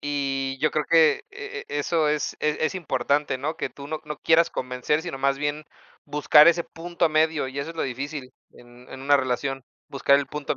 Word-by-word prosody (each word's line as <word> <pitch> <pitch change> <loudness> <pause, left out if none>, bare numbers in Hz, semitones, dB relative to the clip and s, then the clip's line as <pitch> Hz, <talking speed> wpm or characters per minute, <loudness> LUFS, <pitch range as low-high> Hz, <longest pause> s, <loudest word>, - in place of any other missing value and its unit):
Y 135 -2 -2
yo 155 - +1
creo 155 - -1
que 160 -3 +5
e - - -8
e 145 - -3
eso 155 +1 +1
es 150 0 -1
es 150 0 0
es 155 - 0
importante, 145 -4 0
¿no? 150 +5 -4
Que - - -2
tú 140 - -11
no 155 +1 -4
no 150 - -5
quieras 165 +3 +3
convencer, 125 +4 -2
sino 170 -6 -6
más 140 0 +1
bien 145 +2 -3 0.4
buscar 150 +2 +6
ese 170 0 +2
punto 170 0 -2
medio, 155 -2 +2
y 130 +1 -7
eso 140 +4 -4
es 165 - -11
lo - - -1
difícil 135 +1 -5 0.2
en 120 +1 -17
en 130 - -9
una 145 +1 +4
relación, 135 +1 -2 0.3
buscar 140 0 +3
el 140 - -2
punto 150 -2 -4
145 Hz, 210 wpm, -24 LUFS, 135-155 Hz, 0.4 s, buscar